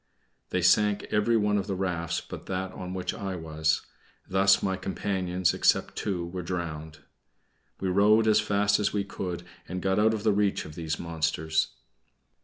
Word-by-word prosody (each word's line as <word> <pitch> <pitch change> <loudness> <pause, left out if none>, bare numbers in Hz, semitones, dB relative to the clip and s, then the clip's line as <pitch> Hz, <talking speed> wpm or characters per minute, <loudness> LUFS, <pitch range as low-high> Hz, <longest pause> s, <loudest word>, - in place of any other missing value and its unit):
They 90 - -1
sank 105 +3 +4
every 110 +2 +3
one 105 -1 +2
of 100 - -4
the 100 - -2
rafts 90 -3 -2
but - - -9
that 95 0 -3
on 90 0 -6
which 90 -1 -2
I 95 -2 -4
was; 80 -1 -1 0.4
thus 95 +1 +4
all - - +1
my 95 - 0
companions, 95 -1 -1
except - - +2
two, 90 -4 -2
were 90 +1 -5
drowned. 80 -3 -5 0.8
We 95 - -2
rowed 105 +4 +4
as 110 -1 +5
fast 105 0 +2
as 105 - +1
we 100 -1 0
could, 90 -3 -5 0.2
and 90 - -4
got 95 +2 +1
out 110 +1 +4
of 105 - -5
the 110 -2 +3
reach 100 -1 +1
of 75 - -9
these 80 -1 -3
monsters. 80 -1 -1
95 Hz, 180 wpm, -28 LUFS, 85-105 Hz, 0.8 s, as